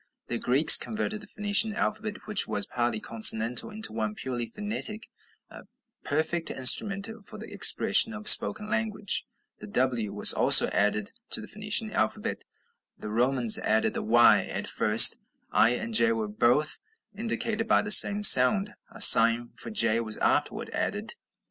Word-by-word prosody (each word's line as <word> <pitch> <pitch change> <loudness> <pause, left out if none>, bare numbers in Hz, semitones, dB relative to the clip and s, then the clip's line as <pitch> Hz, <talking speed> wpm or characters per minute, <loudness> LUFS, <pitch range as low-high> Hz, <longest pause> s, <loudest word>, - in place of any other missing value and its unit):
The 120 - -6
Greeks 135 +5 +4
converted 215 -1 -7
the 210 - -14
Phoenician 210 +1 -2
alphabet, 215 -1 -6
which 210 -2 +2
was 105 - -6
partly 120 -2 -5
consonantal, 115 - 0
into 215 - -3
one 110 -1 -6
purely 120 -1 -7
phonetic 210 - -3 0.4
"a - - -15 0.4
perfect 160 +3 -4
instrument 195 - +2 0.2
for 215 +2 -10
the 215 - -13
expression 225 - +4
of 215 -1 -9
spoken 210 0 +3
language." 215 -3 -3 0.3
The 105 - -12
w 120 -2 -4
was 105 0 +3
also - - +4
added 105 +1 -3 0.2
to - - -2
the - - -13
Phoenician - - -4
alphabet. - - -5 0.5
The 105 - -11
Romans 120 0 +2
added 110 +1 -2
the - - -6
y. 120 +2 +2
At - - -8
first - - +3 0.3
i 110 - +1
and 225 - -6
j 230 +1 +1
were 220 -1 -6
both 150 - -2 0.3
indicated 225 0 -6
by - - 0
the 210 - -6
same 205 +1 +7
sound; 195 +6 +5 0.2
a - - -16
sign 115 0 +5
for - - -10
j 115 - -1
was 110 -2 -6
afterward - - -4
added. - - -6
155 Hz, 155 wpm, -24 LUFS, -, 0.5 s, same